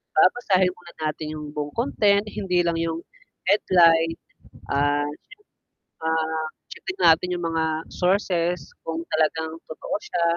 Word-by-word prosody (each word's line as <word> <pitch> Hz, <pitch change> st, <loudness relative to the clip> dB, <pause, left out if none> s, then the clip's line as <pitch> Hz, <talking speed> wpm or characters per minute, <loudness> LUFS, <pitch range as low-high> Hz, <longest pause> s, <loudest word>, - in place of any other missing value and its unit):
Babasahin 185 Hz, +1 st, +4 dB
muna 175 Hz, -1 st, -15 dB, 0.2 s
natin 155 Hz, +1 st, -5 dB
'yong 150 Hz, -1 st, -6 dB
buong 145 Hz, -1 st, -3 dB
content, 205 Hz, -5 st, +3 dB
hindi 180 Hz, -4 st, 0 dB
lang 170 Hz, -1 st, 0 dB
yung 165 Hz, 0 st, -2 dB, 0.5 s
headline, 165 Hz, -5 st, +5 dB, 0.6 s
ah. 145 Hz, +1 st, +2 dB, 1.0 s
Ah, 160 Hz, 0 st, 0 dB, 0.3 s
checkin 380 Hz, 0 st, -6 dB
natin 180 Hz, +2 st, +5 dB
yung 175 Hz, -, -4 dB
mga 160 Hz, -1 st, 0 dB
sources, 180 Hz, -4 st, 0 dB, 0.2 s
kung 165 Hz, +1 st, -2 dB
talagang 160 Hz, 0 st, +1 dB
totoo 155 Hz, -, -5 dB
siya, 175 Hz, -4 st, -2 dB
165 Hz, 120 wpm, -24 LUFS, 160-180 Hz, 1.0 s, headline